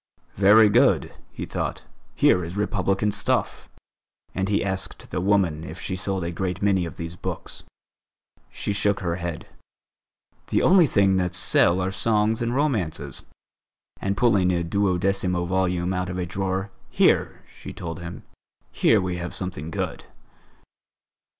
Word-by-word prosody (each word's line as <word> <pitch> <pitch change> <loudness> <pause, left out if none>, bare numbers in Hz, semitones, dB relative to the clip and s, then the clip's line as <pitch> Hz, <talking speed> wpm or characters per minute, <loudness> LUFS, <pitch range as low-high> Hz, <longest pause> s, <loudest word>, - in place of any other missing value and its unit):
"Very 105 +3 +7
good!" 105 - +3 0.2
he - - -6
thought, - - -4 0.3
"here 90 - +4
is 85 +4 -6
Republican 100 0 0
stuff!" - - -1 0.6
and 95 +1 -1
he 100 - +1
asked 95 -1 -5
the - - -2
woman 90 -5 +1
if - - -8
she 95 - -4
sold 95 -1 -2
a 85 - -3
great 90 +1 -3
many 95 -3 +2
of - - -9
these 85 +1 -6
books. - - -6 0.8
She 100 - -3
shook 100 0 +1
her 85 -2 -1
head: 85 -3 -5 1.0
"The - - +1
only 180 -3 +6
things 95 -5 +3
that 90 -1 -1
sell 90 -1 +3
are 95 +1 -1
songs 110 +2 +1
and 120 0 0
romances," 90 - -1 0.8
and 100 0 -1
pulling 100 -7 +3
a 85 -1 0
duodecimo 90 -1 0
volume 90 0 0
out 90 0 -2
of 90 - -4
a 90 - -2
drawer: 95 +2 -3 0.2
"Here," - - +2
she - - -11
told 85 +1 -6
him, 85 0 -8 0.5
"here - - +3
we 90 -1 -2
have 85 0 -5
something 85 -4 -4
good." - - -4
95 Hz, 150 wpm, -24 LUFS, 90-100 Hz, 1.0 s, Very